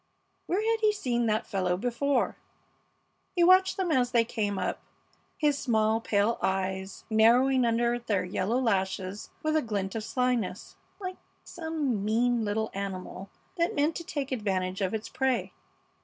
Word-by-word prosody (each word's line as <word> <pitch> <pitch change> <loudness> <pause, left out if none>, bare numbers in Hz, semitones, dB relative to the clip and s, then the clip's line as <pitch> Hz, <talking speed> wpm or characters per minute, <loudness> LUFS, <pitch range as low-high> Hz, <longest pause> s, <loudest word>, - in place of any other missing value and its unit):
Where 385 +5 0
had 450 0 +1
he 430 -1 +4
seen 240 - -1
that 215 +2 +1
fellow 185 -4 0
before? 250 +6 0 1.0
He 350 - +4
watched 370 +1 +5
them 370 -3 0
as 250 -4 +3
they 235 -2 +3
came 210 -4 -2
up, - - -2 0.6
his 295 -2 +2
small, 220 -2 +2
pale 215 +1 +1
eyes 190 0 -2
narrowing 245 +4 +5
under 235 +1 +1
their 205 -6 -1
yellow 190 +6 0
lashes 195 -4 -1
with 310 0 +1
a 310 - +4
glint 200 -5 -3
of 225 - -3
slyness, 245 -6 -1 0.2
like 370 -2 -5 0.3
some 310 - -2
mean 235 +2 +2
little 220 +1 -1
animal 195 -1 -5 0.3
that 340 +1 +1
meant 295 +3 +1
to 335 - -6
take 285 -4 -4
advantage 190 -5 -1
of 190 +2 0
its 220 - -4
prey. 260 -1 -1
230 Hz, 155 wpm, -28 LUFS, 200-275 Hz, 1.0 s, watched